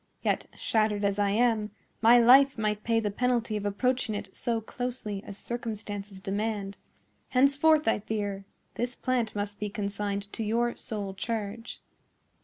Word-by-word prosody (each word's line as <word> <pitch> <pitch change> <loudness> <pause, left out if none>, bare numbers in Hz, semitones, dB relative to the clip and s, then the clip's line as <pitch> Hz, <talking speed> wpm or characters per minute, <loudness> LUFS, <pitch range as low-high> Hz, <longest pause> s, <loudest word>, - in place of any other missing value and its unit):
Yet, - - 0
shattered 215 -2 +1
as 200 0 0
I 205 -1 +3
am, 220 0 +2 0.3
my 230 +2 +7
life 265 +3 +7
might 210 -1 -1
pay 230 0 +2
the 210 -2 -1
penalty 235 -1 0
of 205 -1 -1
approaching 245 +2 0
it 205 -2 -7
so 235 -1 0
closely 225 -3 -4
as 200 - -8
circumstances 210 -4 -5
demand. 200 +1 -2 0.5
Henceforth, 280 +4 +4
I 225 - +3
fear, 205 -2 -3 0.3
this 245 0 -3
plant 245 -4 -1
must 205 0 -3
be 210 - -2
consigned 200 -1 -3
to 225 - -3
your 235 +3 +1
sole 205 -3 -5
charge." 220 +2 -5
215 Hz, 150 wpm, -28 LUFS, 205-240 Hz, 0.5 s, my